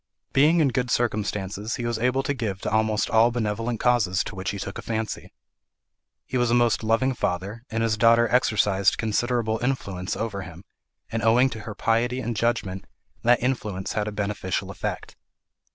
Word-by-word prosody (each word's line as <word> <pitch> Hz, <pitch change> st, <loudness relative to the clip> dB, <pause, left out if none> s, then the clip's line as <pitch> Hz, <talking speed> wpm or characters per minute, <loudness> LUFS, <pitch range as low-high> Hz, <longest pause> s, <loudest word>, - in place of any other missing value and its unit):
Being 155 Hz, +5 st, +5 dB
in 145 Hz, -, +4 dB
good 125 Hz, -1 st, -1 dB
circumstances, 105 Hz, -2 st, -1 dB
he 120 Hz, -, -4 dB
was 120 Hz, -1 st, -1 dB
able 125 Hz, +3 st, +1 dB
to 145 Hz, -, -1 dB
give 110 Hz, -8 st, -3 dB
to -, -, -3 dB
almost 110 Hz, -1 st, +1 dB
all 115 Hz, +1 st, +5 dB
benevolent 115 Hz, 0 st, -2 dB
causes 110 Hz, -7 st, +2 dB
to -, -, -7 dB
which 95 Hz, +2 st, -4 dB
he 100 Hz, -, -3 dB
took 100 Hz, 0 st, -5 dB
a -, -, -5 dB
fancy. 110 Hz, -1 st, -4 dB, 0.9 s
He 130 Hz, -, -2 dB
was 120 Hz, -1 st, +2 dB
a 120 Hz, -, +3 dB
most 120 Hz, -2 st, +2 dB
loving 115 Hz, +4 st, +2 dB
father, 100 Hz, +1 st, -3 dB
and 115 Hz, 0 st, -1 dB
his 110 Hz, -1 st, +1 dB
daughter 115 Hz, +2 st, +5 dB
exercised 105 Hz, -5 st, +2 dB
considerable 110 Hz, 0 st, 0 dB
influence 100 Hz, -8 st, -2 dB
over 105 Hz, -3 st, -3 dB
him, 85 Hz, +1 st, -10 dB, 0.5 s
and 115 Hz, -, -1 dB
owing 120 Hz, +4 st, +4 dB
to 115 Hz, -, -6 dB
her 105 Hz, -, -6 dB
piety 120 Hz, +4 st, +1 dB
and 120 Hz, -2 st, -3 dB
judgment, 100 Hz, -4 st, -1 dB, 0.4 s
that 120 Hz, 0 st, +3 dB
influence 105 Hz, -7 st, -2 dB
had 105 Hz, -1 st, -1 dB
a -, -, -2 dB
beneficial 105 Hz, -3 st, -2 dB
effect. -, -, -5 dB
115 Hz, 180 wpm, -25 LUFS, 105-120 Hz, 0.9 s, Being